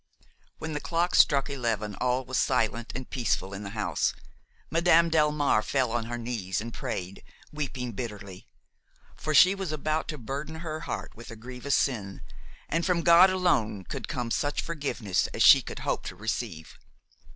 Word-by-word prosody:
When 160 -1 -5
the 150 - -2
clock 170 +3 -1
struck 140 -3 +5
eleven 115 -7 -2
all 125 +1 +1
was 130 +1 -1
silent 120 -3 0
and 130 0 -5
peaceful 115 -6 -1
in 95 - -6
the 100 - -6
house. 90 -7 0 0.6
Madame 170 0 +4
Delmare 150 -7 +3
fell 130 -2 0
on 115 -1 -1
her 120 +1 -4
knees 115 -6 -3
and 115 +2 -6
prayed, 95 -7 -5 0.3
weeping 135 -5 -4
bitterly; 100 -5 -7 0.7
for 155 0 -2
she 180 +6 +8
was 195 -4 -4
about 155 +1 -1
to 155 - -4
burden 140 +6 -6
her 155 -2 -4
heart - - -4
with 115 - -12
a 115 - -8
grievous 125 +4 -3
sin, 100 -8 -1 0.5
and 165 - 0
from 175 -2 +1
God 175 +2 +8
alone 115 - +1
could - - -6
come 120 -2 -3
such 145 +4 -1
forgiveness 140 - -1
as - - +2
she - - +9
could - - -8
hope - - -1
to - - -6
receive. 105 -7 -5
130 Hz, 170 wpm, -28 LUFS, 110-155 Hz, 0.7 s, she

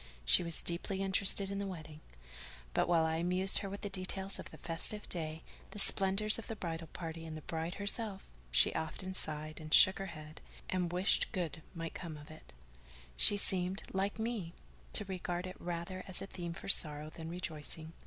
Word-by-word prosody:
She - - +8
was 170 -1 0
deeply 190 +3 -2
interested 195 0 +3
in 200 - -3
the 200 - -3
wedding; 155 -4 -9 0.7
but - - +1
while 165 -2 +3
I 160 0 0
amused 180 +3 +3
her 200 - -5
with 200 +1 -7
the - - -3
details 190 0 -2
of - - -8
the - - -13
festive 175 +5 0
day, 160 -2 -4 0.3
the - - -10
splendours 195 +2 +5
of 230 - -9
the 225 - -5
bridal 165 -4 -5
party 165 0 -7
and 160 -1 -7
of 155 - -10
the - - -24
bride 165 +2 -3
herself, 200 -1 -4 0.2
she - - +5
often 185 +4 -4
sighed 155 -3 -4
and 155 -1 -9
shook 190 +4 +8
her 195 - -4
head, 155 -2 -10 0.3
and 180 -2 -1
wished 180 +2 +2
good 165 -3 -3
might 165 -1 -5
come 165 -4 -7
of 150 +1 -13
it; 155 - -14 0.6
she 205 - +6
seemed, 190 -1 +2
like 195 +2 -1
me, 220 -7 -4 0.4
to 210 - +4
regard 180 -2 -4
it 185 0 -9
rather 175 +2 -5
as 185 - -3
a - - -5
theme 175 -3 -6
for 185 - -9
sorrow 150 -4 +4
than 160 0 -8
rejoicing. 160 -2 -4
175 Hz, 195 wpm, -34 LUFS, 160-195 Hz, 0.7 s, She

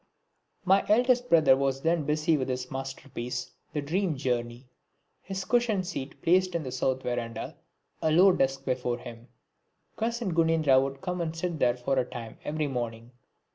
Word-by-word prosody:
My 195 +1 +4
eldest 245 +3 +3
brother 160 -5 +6
was 135 0 -1
then 165 -2 +1
busy 155 +2 +2
with 130 -3 -2
his 125 0 -3
masterpiece 130 -2 -5 0.2
"The 150 - -3
Dream 170 +1 0
Journey," 120 -1 -2 0.6
his 190 0 -5
cushion 235 -5 +2
seat 145 -7 -6
placed 185 +1 +3
in 165 - -1
the 130 - -5
south 130 0 -1
verandah, 115 -2 -4 0.5
a 160 - +2
low 185 +5 +7
desk 135 -4 0
before 125 -2 -1
him. 120 -1 -11 0.7
Cousin 230 -4 -1
Gunendra 160 -5 +4
would 135 0 -4
come 180 -1 -3
and 165 -1 -3
sit 165 -1 -3
there 120 -2 +2
for 130 +2 0
a 125 - +1
time 115 -2 -8
every 155 0 -2
morning. 120 -3 -4
140 Hz, 165 wpm, -28 LUFS, 125-175 Hz, 0.7 s, low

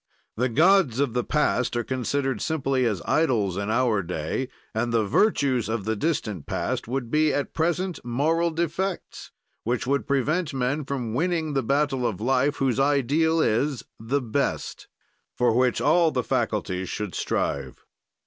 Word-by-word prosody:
"The 125 +3 0
gods 160 - +4
of 140 -5 +1
the 125 0 0
past 125 -4 0
are 120 - 0
considered 130 0 -2
simply 135 -4 0
as 100 -7 -2
idols 115 - +1
in 100 +2 -3
our 115 -3 +2
day 90 +8 -3 0.2
and 120 +2 -1
the 115 -2 +2
virtues 130 - +2
of 110 -3 -2
the 110 0 0
distant 110 - -2
past - - -2
would 125 -1 -3
be, 155 0 +3
at 140 0 -2
present, 175 +2 -1
moral 155 +8 +1
defects 170 +3 -3 0.3
which 120 +2 -1
would 140 +2 0
prevent 145 +3 0
men 135 +3 -1
from 125 -5 -3
winning 160 +2 0
the 135 - +1
battle 135 0 +1
of 100 - -4
life, 130 +5 +1
whose 135 -2 0
ideal 145 +4 +2
is 130 +3 +1 0.2
The 130 +6 -1
Best 110 -3 -2 0.5
for 120 -2 +3
which 125 -1 +2
all 165 +2 +4
the 125 -5 -1
faculties 95 -3 -1
should 105 -3 -4
strive." - - -2
130 Hz, 160 wpm, -25 LUFS, 115-150 Hz, 0.5 s, gods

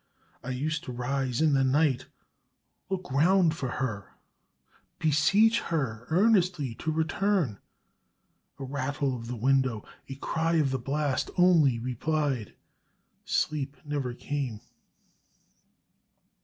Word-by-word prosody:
I 125 - -6
used 145 +5 -2
to - - -5
rise 125 +1 -2
in 155 -2 +4
the 135 -1 +3
night, 135 0 +2 0.8
look 185 -5 -4
round 170 +4 +4
for 130 -6 -3
her, 105 -7 -4 0.8
beseech 195 +9 +4
her 125 -8 -3
earnestly 180 - +2
to 160 - -1
return. 160 - 0 1.0
A 140 - -7
rattle 135 0 -2
of 115 -1 -7
the 125 - -4
window, 130 -2 +1 0.2
a 135 - -5
cry 165 +4 -1
of 150 -4 +2
the 130 - -1
blast 140 +2 -1
only 165 -9 +5
replied 130 0 -2 0.7
Sleep 145 -2 -1
never 140 -4 -3
came! 130 -6 -4
140 Hz, 115 wpm, -28 LUFS, 130-160 Hz, 1.0 s, only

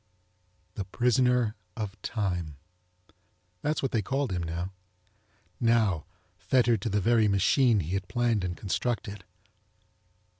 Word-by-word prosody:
THE 100 - -4
PRISONER 125 +1 +2 0.2
OF 105 -2 -5
TIME! 90 -8 -2 1.1
That's 150 0 -1
what 135 - 0
they 115 - +1
called 135 +3 -1
him 90 -2 -1
now! 85 +3 -3 0.9
Now, 110 -9 +2 0.3
fettered 115 +3 +2
to 115 - -1
the 105 0 +1
very 110 +1 +3
machine 105 +3 +3
he 80 +1 -5
had 95 -1 -2
planned 120 -5 +1
and 90 -1 -3
constructed. 105 -1 -2
105 Hz, 120 wpm, -28 LUFS, 95-120 Hz, 1.1 s, very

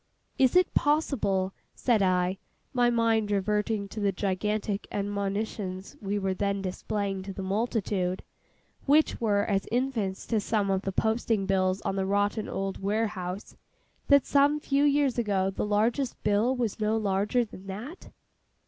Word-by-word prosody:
'Is 260 +2 +4
it 365 0 +4
possible,' 210 -11 +1 0.2
said 235 -5 +2
I, 185 0 +1 0.3
my 245 -1 +3
mind 225 -2 +2
reverting 210 +1 0
to 220 - -6
the 200 -1 +2
gigantic 200 +2 -2
admonitions 200 -1 -3
we 205 0 -1
were 195 -1 0
then 200 +1 -1
displaying 195 +1 -3
to 195 +1 -6
the 190 0 -6
multitude—which 210 +7 -1
were 205 -3 +2
as 195 -2 0
infants 235 -6 -1
to 225 - +1
some 205 -1 0
of 190 -1 +1
the 195 - -3
posting 220 0 0
bills 190 0 +1
on 195 - -2
the 190 0 0
rotten 205 +2 0
old 195 0 -3
warehouse—'that 205 +6 -1
some 285 +1 +3
few 280 -1 +1
years 280 -3 +2
ago 195 -4 +1
the 195 - -3
largest 230 +6 +1
bill 210 +5 +2
was 235 -5 -2
no 215 +1 +1
larger 210 +3 +1
than 195 -2 -12
that? 225 - -7
205 Hz, 145 wpm, -28 LUFS, 195-230 Hz, 0.3 s, Is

